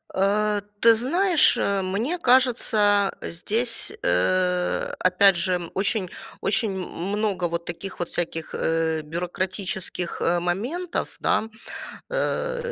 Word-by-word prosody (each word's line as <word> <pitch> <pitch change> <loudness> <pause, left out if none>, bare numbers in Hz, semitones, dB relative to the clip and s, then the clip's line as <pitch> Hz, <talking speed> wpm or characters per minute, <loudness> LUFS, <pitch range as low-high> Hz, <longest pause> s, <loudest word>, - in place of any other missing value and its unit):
Э, 205 +2 +1 0.2
ты 230 +1 +7
знаешь, 335 - +4
э, 200 -1 0
мне 220 - -1
кажется, 225 - +3
здесь, 230 +7 -1
э, 180 - +1
опять 185 +1 +4
же 175 -1 -1
очень 200 -1 0 0.3
очень 220 +1 +1
много 190 +1 -2
вот 170 0 -4
таких 180 +3 -6
вот 175 - -2
всяких, 165 -2 -3
э, 160 -1 0
бюрократических 180 +2 -3 0.2
моментов, 245 - -3
да. 220 - +1 0.6
Э, - - -2
195 Hz, 105 wpm, -24 LUFS, 175-230 Hz, 0.6 s, ты